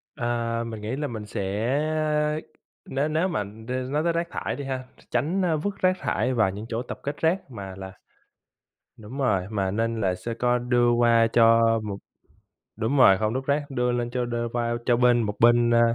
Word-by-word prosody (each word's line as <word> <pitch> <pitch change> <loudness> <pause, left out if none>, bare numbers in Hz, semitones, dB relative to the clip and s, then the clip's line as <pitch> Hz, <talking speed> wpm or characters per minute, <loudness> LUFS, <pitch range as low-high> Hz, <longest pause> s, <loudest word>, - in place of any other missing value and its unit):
Ờ, 120 -2 -1
mình 110 -2 -7
nghĩ 110 +4 -3
là 145 +1 -2
mình 110 -4 -6
sẽ 105 - -4 1.4
nếu 140 +3 -1
nếu 160 +4 +1
mà, 175 - -1 0.3
ơ, 125 - -2
nói 150 +3 0
tới 170 0 +1
rác 170 +1 -1
thải - - -3
đi 140 - -6
ha, 130 -1 -3 0.3
tránh 155 +11 0 0.2
vứt 205 0 -2
rác 185 0 +3
thải 130 - 0
vào 110 -5 +3
những 105 +3 -7
chỗ 115 0 -2
tập 125 - -7
kết 145 +1 -3
rác, 165 -2 0
mà 100 -5 -7
là 95 0 -7 1.1
đúng 110 +5 -9
rồi, 100 -9 +1
mà 100 -3 -1
nên 115 +2 -1
là 95 -2 +1
sẽ 105 +6 -5
có 125 +1 +1
đưa 120 0 +2
qua 120 -1 +4
cho 115 0 +6 0.2
một 100 -2 -4 0.8
đúng 110 +6 -1
rồi, 95 -8 +7
hông 110 +2 -1
đốt 130 +1 -3
rác 145 +1 0
đưa 125 -2 0
lên 120 -1 -1
cho 125 0 -1
đơ 120 -1 -2
qua 120 -1 -1
cho 120 - +4
bên 120 -1 +4
một 105 -2 -2
bên, 120 0 +5
a, 120 0 +4
120 Hz, 205 wpm, -25 LUFS, 115-135 Hz, 1.4 s, rồi